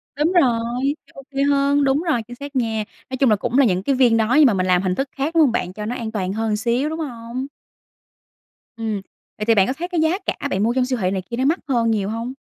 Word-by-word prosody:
Đúng 300 +5 +1
rồi, 240 -7 +2 0.3
thấy - - -24
ô 275 - -10
kê 275 0 0
hơn, 280 0 +2
đúng 275 +3 +2
rồi 300 -9 +1
chính 245 - -9
xác 285 +1 -9
nha. 225 -3 0 0.3
Nói 260 - -4
chung 270 -2 +3
là 215 - +5
cũng 240 +5 -2
là 275 - +6
những 185 -4 +1
cái 275 +4 +1
viên 240 -3 +4
đó 225 +2 +1
nhưng 300 - +8
mà 235 - +4
mình 185 -1 0
làm 180 0 +3
hình 185 -1 -1
thức 275 0 -2
khác, 285 +4 -3
đúng 325 - +6
hông 275 -6 +4
bạn, 180 -6 -2
cho 210 +1 -6
nó 245 +3 -3
an 230 -3 -5
toàn 190 -3 -2
hơn 220 0 -1
xíu, 240 +6 0
đúng 320 +1 -5
hông? 245 -2 -5 1.3
Ừm, 220 -3 -3 0.4
vậy 210 - -3
thì 230 -1 +4
bạn 195 -2 +4
có 260 - 0
thấy 340 +5 -5
cái 345 -3 -1
giá 320 +4 +2
cả - - -2
bạn 195 +2 0
mua 235 +2 +2
trong 255 -1 +1
siêu 255 -2 -2
thị 185 - +1
này 190 -1 -2
kia 235 - -4
nó 260 - 0
mắc 325 +6 +2
hơn 235 -4 +1
nhiều 205 -2 -1
hông? 230 +3 -4
240 Hz, 285 wpm, -21 LUFS, 220-275 Hz, 1.3 s, nhưng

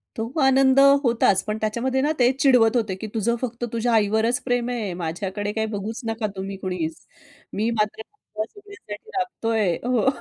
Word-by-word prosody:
तो 225 - -2 0.2
आनंद 265 0 +5 0.2
होताच 230 -6 +3
पण 210 0 -1
त्याच्यामध्ये 235 +5 -1
ना 295 +3 +1
ते 245 0 +5
चिडवत 250 -5 +5
होते, 215 -5 -1
की 205 +4 -6
"तुझं 230 +1 +1
फक्त 240 -1 -4
तुझ्या 230 +1 0
आईवरच 220 +3 +2
प्रेम 245 -1 0
आहे. 225 -7 -3
माझ्याकडे 185 +4 -3
काही 220 0 -1
बघूच 215 +3 -5
नका 225 -1 -2
तुम्ही 195 +1 -5
कोणीच. 180 -4 -3 0.6
मी 215 +3 0
मात्र 215 -1 -1
तुम्हा 220 - -7
सगळ्यांसाठी 405 - -12
राबतोय." 225 - 0 0.2
हो. 250 0 +2
225 Hz, 165 wpm, -23 LUFS, 205-245 Hz, 0.6 s, आनंद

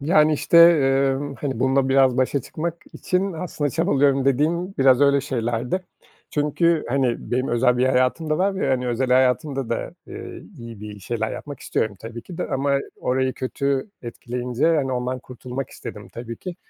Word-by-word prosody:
Yani, 155 +1 +4
işte, 155 +3 +1 0.2
eee, 135 0 +2 0.2
hani, 135 -3 -3
bununla 135 0 +2
biraz 135 -2 +4
başa 130 +2 +1
çıkmak 165 +6 -4 0.2
için 185 +2 -1
aslında 160 -4 -3
çabalıyorum 140 -3 +2
dediğim 165 +8 +1
biraz 135 -1 +5
öyle 140 0 +4
şeylerdi. 125 +5 -2 0.5
Çünkü, 155 +2 +1
hani, 130 -2 -1
benim 130 +2 0
özel 125 +1 +2
bir 130 - +3
hayatım 130 +5 +1
da 155 - +1
var 195 +2 +1
ve, 180 - -1
hani, 125 -1 0
özel 125 +2 0
hayatımda 130 +1 +2
da, 115 - -3
eee, - - -8 0.2
iyi 115 -3 -9
bir 105 -1 -8
şeyler 110 +2 -3
yapmak 145 -3 -8
istiyorum 105 -2 -2
tabii 115 +1 -8
ki 175 - -10
de - - -2
ama 140 +1 +1 0.2
orayı 130 +1 0
kötü 140 +5 -2
etkileyince, 125 +2 -3
hani, 135 -3 0
ondan 125 +1 -2
kurtulmak 125 +1 -7
istedim - - -9
tabii 115 -1 -7
ki. 180 -2 -7
135 Hz, 170 wpm, -23 LUFS, 125-145 Hz, 0.5 s, biraz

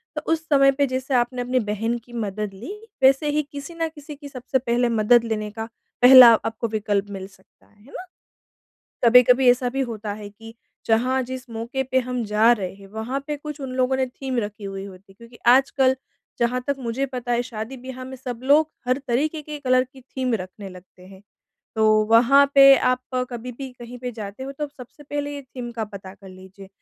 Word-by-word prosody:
तो - - -3
उस 325 0 -1
समय 275 -2 +5
पे 280 +1 +1
जैसे 260 +1 -3
आपने 245 0 +1
अपनी 250 +1 0
बहन 225 +2 -2
की 240 - -16
मदद 210 -3 -4
ली, 220 - -8 0.3
वैसे 270 +3 +4
ही 300 +1 +1
किसी 285 +4 -8
ना 330 -1 -1
किसी 300 -1 -11
की 285 0 -11
सबसे 260 0 -2
पहले 240 -1 0
मदद 230 +1 +4
लेने 215 -2 -3
का 220 +1 -5 0.4
पहला 250 -1 +10
आपको 225 +1 -3
विकल्प 210 -2 -1
मिल 190 -1 -7
सकता 195 -1 -26
है, 205 0 -26
है 270 - -18
ना? 370 - -8 1.0
कभी-कभी 250 +2 +6
ऐसा 245 0 +2
भी 270 +2 -2
होता 220 -4 -4
है 205 0 -9
कि, 225 +2 -13 0.3
जहाँ 250 +4 +2
जिस 255 0 -8
मौके 235 +4 -3
पे 260 0 +1
हम 250 -1 -3
जा 215 +3 +4
रहे 195 -6 -1
हैं, 195 0 -15
वहाँ 220 +6 -4
पे 300 - -2
कुछ 300 0 -8
उन 265 -1 -5
लोगों 255 0 +1
ने 260 - +1
थीम 260 0 -5
रखी 210 -1 -6
हुई 195 0 -6
होती 195 0 -14
है, - - -21
क्योंकि 235 +1 -15
आजकल 260 +1 +4 0.4
जहाँ 245 +1 0
तक 280 - +1
मुझे 250 +2 -2
पता 250 -2 -5
है, 240 0 +2
शादी 235 +1 -7
ब्याह 255 +1 -8
में 260 +1 -8
सब 245 -2 -6
लोग 300 +3 +4 0.2
हर 255 - +2
तरीके 300 +6 0
के 300 0 -8
कलर 255 -2 +2
की 265 - -15
थीम 255 0 -3
रखने 195 0 -8
लगते 180 0 -15
हैं। 190 0 -15 0.6
तो 220 - +2 0.3
वहाँ 255 +5 +6
पे 275 0 +9
आप 255 0 +1 0.3
कभी 245 +1 -6
भी 270 -1 -5
कहीं 240 +1 -9
पे 250 0 -5
जाते 210 +1 -8
हो, 270 +1 -6
तो 295 +2 -4
सबसे 280 0 -14
पहले 290 0 -4
ये 285 - -7
थीम 250 -2 -8
का 225 -1 -3
पता 195 -2 -10
कर 195 -1 -15
लीजिए 190 +1 -14
245 Hz, 215 wpm, -23 LUFS, 220-265 Hz, 1.0 s, पहला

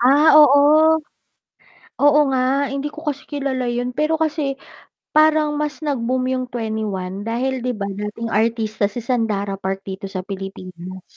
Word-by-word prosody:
Ah, 285 +6 +5
oo. 305 +2 +6 1.0
Oo 290 +1 +5
nga, 265 +2 +1
hindi 280 +1 -2
ko 315 - -11
kasi 280 -1 -4
kilala 275 -3 -2
'yun, 245 +1 -2
pero 310 +1 +1
kasi, 305 -3 0 0.6
parang 310 -1 +4
mas 300 0 -3
nag-boom 255 -3 -1
'yung 255 -1 -1
2ne1 210 -5 -4
dahil 260 +3 -1
di 250 - 0
ba, 200 -1 -4
dating 210 +3 -5
artista 220 -1 0
si 240 - -5
Sandara 215 -5 -1
Park 190 0 -3
dito 195 +1 -6
sa 185 - -4
Pilipinas. 185 -2 -8
250 Hz, 145 wpm, -20 LUFS, 205-290 Hz, 1.0 s, oo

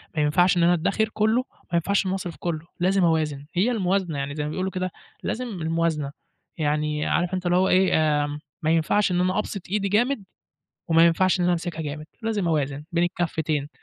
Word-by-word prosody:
ما 155 - +1
ينفعش 175 +5 +3
إن 170 - +3
أنا 175 +1 +5
أدّخِر 220 +6 +1
كُلّه، 215 +2 +1
وما 255 - -10
ينفعش 195 +5 +2
إن - - -1
أنا 190 - 0
أصرف 175 -3 -5
كُلّه، 165 -2 -3
لازم 190 +1 +2
أوازن. 155 -4 +1
هي 200 +8 +2
الموازنة، 185 -7 0
يعني 140 +1 -3
زي 150 - -2
ما 150 - -3
بيقولوا 185 +4 -2
كده 185 -1 -3 0.3
لازم 250 +2 -2
الموازنة. 160 -3 0 0.5
يعني 150 0 0
عارف 175 +1 0
أنت 185 -1 -2
اللي 175 +1 +3
هو 190 +1 +3
إيه، 185 +1 +4 0.3
آمم 145 0 -5 0.2
ما 160 0 +1
ينفعش 175 +5 +2
إن 180 - +1
أنا 185 +3 +1
أبسط 205 -2 -4
إيدي 200 0 0
جامد، 235 +2 +1 0.6
وما 165 0 +6
ينفعش 185 +3 +3
إن 180 - +2
أنا 175 0 +3
أمسكها 165 -1 -3
جامد، 150 0 -5 0.2
لازم 215 -5 -1
أوازن 145 -2 -1
بين 170 0 +2
الكفّتين. 160 -4 -1
175 Hz, 205 wpm, -24 LUFS, 155-190 Hz, 0.6 s, وما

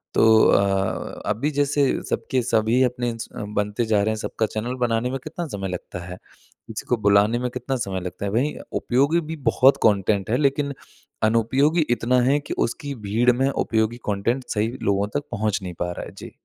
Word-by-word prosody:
तो - - +4 0.3
अ, 95 -1 0
अभी 115 +8 0
जैसे 145 0 +1 0.3
सबके 130 - 0
सभी 115 +1 +2
अपने 125 -1 0
च 115 - -7 0.3
बनते 105 +3 0
जा 110 -2 +2
रहे 110 - +1
हैं 110 - 0
सबका 110 +1 -2
चैनल 115 +4 -4
बनाने 115 +1 0
में 135 - -3
कितना 165 +2 -5
समय 100 -7 -4
लगता 90 0 -6
है, 90 +1 -8 0.5
किसी - - -6
को 125 - +3
बुलाने 100 +4 +4
में 125 0 -1
कितना 125 +2 -3
समय 95 -5 -3
लगता 90 +2 -5
है? 100 - -2
वही 130 +8 0 0.3
उपयोगी 140 +7 +2
भी - - -3 0.2
बहुत 135 +2 +5
कंटेंट 100 -2 +2
है, 125 - +3
लेकिन 140 0 +1 0.5
अनुपयोगी 130 +9 +3
इतना 125 +2 +2
है 135 +4 +3
कि - - -2
उसकी 145 +4 -6
भीड़ 115 +5 +3
में 130 +3 +1
उपयोगी 110 -3 0
कंटेंट 115 +6 0
सही 105 +1 +1 0.2
लोगों 100 0 +1
तक 145 - 0
पहुँच 105 0 0
नहीं 90 -1 -5
पा 90 0 -1
रहा - - -6
है। - - -10
जी। - - -9
115 Hz, 195 wpm, -23 LUFS, 105-130 Hz, 0.5 s, बहुत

